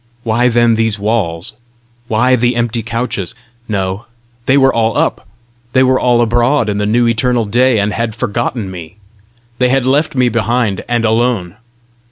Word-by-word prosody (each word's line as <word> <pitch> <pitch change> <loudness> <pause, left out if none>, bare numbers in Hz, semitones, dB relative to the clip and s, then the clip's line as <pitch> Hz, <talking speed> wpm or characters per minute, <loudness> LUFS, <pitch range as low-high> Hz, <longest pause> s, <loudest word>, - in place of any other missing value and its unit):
Why 115 +2 +1
then 120 -1 +3
these 110 -1 0
walls? 100 -2 -2 0.5
why 125 +4 +2
the 120 0 +1
empty 120 -1 -1
couches? 115 -3 -4 0.3
No; 95 0 -3 0.4
they 135 - +4
were 135 -1 +4
all 115 -1 0
up! - - -1 0.5
they 130 - +4
were 130 0 +3
all 120 -1 +2
abroad 120 +1 +1
in 100 0 -1
the 105 - 0
new 120 +2 +2
eternal 115 0 +1
day, 125 +3 +2
and 100 +1 0
had 115 -2 -2
forgotten 115 -3 -3
me! 85 -2 -9 0.6
They 125 -1 +3
had 135 -1 +1
left 145 +3 +1
me 125 -1 +3
behind, 115 -3 0
and 120 -1 +1
alone! 110 -5 0
115 Hz, 165 wpm, -14 LUFS, 105-125 Hz, 0.6 s, they